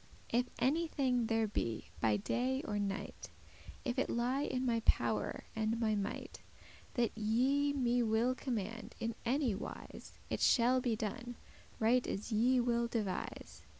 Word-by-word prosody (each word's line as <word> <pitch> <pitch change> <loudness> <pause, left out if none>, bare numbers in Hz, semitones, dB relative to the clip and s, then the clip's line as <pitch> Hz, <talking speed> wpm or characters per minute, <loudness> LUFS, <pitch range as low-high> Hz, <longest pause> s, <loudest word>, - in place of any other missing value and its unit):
If 245 +2 +2
any 320 +6 +2
thing 250 -6 +1
there 225 0 +2
be, 115 - -3
by 110 -2 +3
day 255 - 0
or 205 -1 -2
night, 200 -1 -4 0.6
If 245 - 0
it - - +1
lie 245 +4 +1
in 260 -3 -1
my 235 -2 +2
power 225 - +1
and 220 +1 0
my 220 -2 +2
might, 205 -1 -4 0.5
That 240 -4 +1
ye 255 +7 +2
me 245 -3 +2
will 230 +2 +2
command 230 -3 -4
in 230 0 -1
any 260 -2 +2
wise, 195 - -8
It - - -2
shall 255 +1 +5
be 240 -3 +1
done, 235 +3 -4 0.4
right 240 +3 +3
as 210 +4 -4
ye 245 +4 +4
will 235 -1 +2
devise. 215 -5 -4
235 Hz, 150 wpm, -35 LUFS, 220-255 Hz, 0.6 s, shall